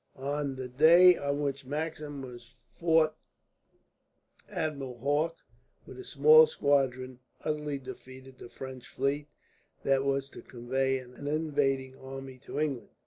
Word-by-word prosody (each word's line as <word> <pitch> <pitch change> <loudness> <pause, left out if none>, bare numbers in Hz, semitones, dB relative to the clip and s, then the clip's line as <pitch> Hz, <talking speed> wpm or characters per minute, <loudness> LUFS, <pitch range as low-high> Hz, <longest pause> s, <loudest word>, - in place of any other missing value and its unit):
On 140 0 -3
the 130 -1 -5
day 165 +8 +7
on 140 -1 -2
which 140 0 -2
Maxim 150 0 -4
was 120 -1 -11 0.2
fought 160 +2 +2 1.3
Admiral 140 -5 -4
Hawke, 145 +6 0 0.5
with 130 - -11
a - - -7
small 155 +2 +7
squadron, 130 -4 0 0.3
utterly 150 -2 -2
defeated 130 0 -11
the 120 - -10
French 130 +1 -9
fleet 140 +2 -2 0.6
that 135 0 +2
was 140 0 -1
to - - -10
convey 130 +2 -1
an 130 +2 -9
invading 140 -4 0
army 135 -1 -9
to 145 - -6
England. 140 -7 -2
135 Hz, 130 wpm, -30 LUFS, 130-150 Hz, 1.3 s, day